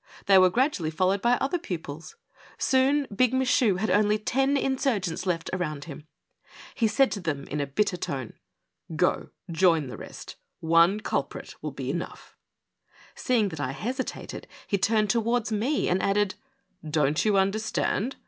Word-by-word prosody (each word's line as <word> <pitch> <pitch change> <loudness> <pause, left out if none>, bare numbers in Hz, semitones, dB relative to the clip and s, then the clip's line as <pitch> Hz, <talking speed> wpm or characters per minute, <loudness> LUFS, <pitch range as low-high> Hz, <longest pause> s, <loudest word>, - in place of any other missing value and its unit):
They 195 -1 +7
were 185 0 +6
gradually 240 - 0
followed 185 +5 +1
by 240 +1 +3
other 270 +7 0
pupils. 165 - -7 0.4
Soon 275 +2 +2
Big 255 +3 +3
Michu 250 -5 +3
had 195 +1 -1
only 210 +2 +3
ten 270 +6 +1
insurgents 255 - -1
left 165 -2 -1
around 155 -6 -3
him. 150 0 -10 0.7
He 230 -4 +1
said 260 +6 +3
to 205 - -3
them, 155 -6 -3
in 150 +1 -4
a 140 - -2
bitter 185 +6 0
tone: 130 -8 -4 0.6
Go 180 +3 +1 0.2
join 165 -5 +3
the - - -7
rest; - - -10 0.2
one 170 +5 +4
culprit - - -3
will - - -3
be - - -4
enough - - -6
I - - -55
" - - -26
Seeing 230 -5 +1
that 160 -4 -8
I 130 -2 -2
hesitated 250 - -5 0.2
he 200 - -1
turned 215 0 +2
towards 235 0 0
me 235 +8 0
and 185 +2 +1
added: 200 -1 +1 0.3
'' 155 - -14
Don't 150 0 +2
you 210 -2 +2
understand 215 +4 0
200 Hz, 165 wpm, -26 LUFS, 165-240 Hz, 0.7 s, They